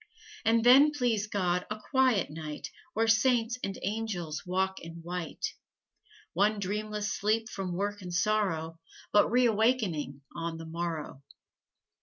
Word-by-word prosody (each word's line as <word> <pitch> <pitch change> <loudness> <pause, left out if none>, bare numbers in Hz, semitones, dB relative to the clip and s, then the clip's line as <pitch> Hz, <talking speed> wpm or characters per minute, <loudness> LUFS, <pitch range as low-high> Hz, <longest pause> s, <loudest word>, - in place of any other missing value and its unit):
And 225 0 +3
then, 265 +5 +8
please 240 -7 0
God, 180 -3 0
a 210 0 -4
quiet 255 - +2
night 150 -2 -6 0.2
Where 225 0 +2
Saints 235 +1 +3
and 195 - -3
Angels 195 -7 -3
walk 190 +1 0
in 165 0 -9
white. 180 - -4 0.8
One 205 +4 +2
dreamless 210 +1 -2
sleep 220 +2 +1
from 190 -6 -4
work 205 +2 -2
and 180 -1 -7
sorrow, 175 -4 0 0.3
But 205 - +5
reawakening 220 - +2
on 165 -1 -3
the 165 - -8
morrow. 160 -4 -4
205 Hz, 130 wpm, -30 LUFS, 170-225 Hz, 0.8 s, then